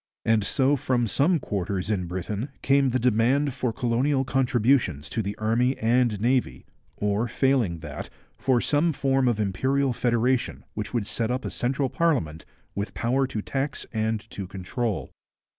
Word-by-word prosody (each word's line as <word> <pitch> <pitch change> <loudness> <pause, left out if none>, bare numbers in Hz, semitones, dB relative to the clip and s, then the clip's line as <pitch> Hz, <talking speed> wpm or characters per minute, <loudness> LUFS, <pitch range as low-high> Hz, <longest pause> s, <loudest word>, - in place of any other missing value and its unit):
And 110 -2 +3
so 135 +6 +2
from 125 -2 0
some 145 - +2
quarters 100 - -2
in 90 -4 -1
Britain 100 +8 -4
came 140 -1 +4
the 130 - +1
demand 125 +4 +2
for 130 -2 -1
colonial 130 +4 +1
contributions 125 - +1
to 115 - -1
the 100 0 -4
Army 120 +4 +1
and 115 -2 +2
Navy, 125 +3 0 0.3
or 105 +3 0
failing 120 - +1
that, 75 -3 -7 0.3
for 130 -2 +2
some 155 +5 +2
form 135 -1 +1
of 115 -3 +1
imperial 130 +7 +1
federation 120 - 0
which 105 -1 -4
would 120 -4 -1
set 115 +2 -1
up 125 +1 -2
a - - -3
central 135 +2 0
parliament 125 - 0 0.3
with 100 +1 -4
power 130 +3 +1
to 110 -5 -4
tax 135 0 -2
and 110 -1 -1
to 100 -2 -6
control. 95 +4 -3
120 Hz, 160 wpm, -25 LUFS, 105-135 Hz, 0.3 s, came